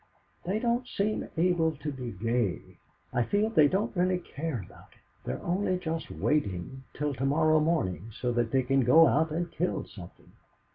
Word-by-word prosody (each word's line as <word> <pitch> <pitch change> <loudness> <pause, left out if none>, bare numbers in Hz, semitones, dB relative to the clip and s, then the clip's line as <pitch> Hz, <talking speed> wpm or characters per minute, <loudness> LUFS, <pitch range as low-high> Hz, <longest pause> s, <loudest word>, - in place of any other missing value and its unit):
"They 190 +4 0
don't 240 +2 0
seem 210 -1 -2
able 165 -2 +2
to 150 +1 -5
be 125 -3 -6
gay. 95 -4 -2 0.3
I 120 - +2
feel 205 - +1
they 155 -9 +6
don't 200 +7 -1
really 180 +1 +2
care 155 - -5
about - - -17
it. - - -26 0.3
They're 65 - -4
only 185 +1 0
just 165 -2 -4
waiting 130 - -2
till 150 0 -1
to 135 - -5
morrow 155 +2 +3
morning, 115 - 0
so 125 - 0
that 120 -1 0
they 130 +2 +2
can 135 +2 +2
go 160 +7 +7
out 160 +1 +2
and 170 +2 -3
kill 180 - -2
something. 90 -4 -13
155 Hz, 180 wpm, -29 LUFS, 120-175 Hz, 0.3 s, go